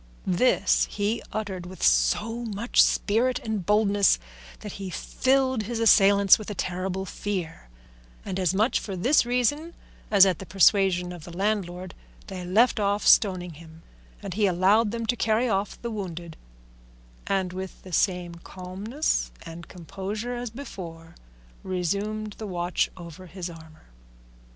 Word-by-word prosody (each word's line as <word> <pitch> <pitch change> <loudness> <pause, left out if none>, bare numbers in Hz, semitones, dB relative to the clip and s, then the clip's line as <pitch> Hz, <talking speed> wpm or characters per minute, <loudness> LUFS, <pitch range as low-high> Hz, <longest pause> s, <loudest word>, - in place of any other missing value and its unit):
This 190 +8 +2
he 210 +3 -1
uttered 190 -5 -4
with 185 -1 -9
so 230 +3 +2
much 225 +1 +2
spirit 240 +5 +2
and 220 -4 -3
boldness 205 0 +3 0.4
that 210 - -7
he 195 -1 -6
filled 260 +5 0
his 230 +3 -4
assailants 200 -3 +6
with 215 - -7
a 210 - -5
terrible 185 +1 -3
fear, 180 - -5 0.6
and 190 - -3
as 185 -2 +2
much 215 +6 +2
for 195 - -6
this 240 +8 +3
reason 290 +7 0 0.3
as 200 -2 +7
at 185 -4 0
the 190 - -7
persuasion 190 -2 +3
of 175 -3 -9
the 170 +1 -10
landlord 185 -3 -2 0.3
they 185 -2 -7
left 215 +7 +3
off 205 0 0
stoning 180 -4 +4
him, 160 +1 -15 0.4
and - - -5
he 205 +1 +2
allowed 195 +5 +3
them 230 +1 -4
to 245 - 0
carry 225 +2 +1
off 200 -2 -1
the 235 - -3
wounded, 175 -6 -6 0.9
and 190 -2 -1
with 190 0 -7
the 185 - -11
same 180 -1 0
calmness 190 - -3
and 165 0 -10
composure 195 +6 -6
as 240 0 -4
before 170 -10 -9 0.5
resumed 200 +4 -2
the 215 - -5
watch 175 -1 -1
over 175 +1 -10
his 180 -1 -6
armour. 160 -1 -15
195 Hz, 145 wpm, -26 LUFS, 180-215 Hz, 0.9 s, as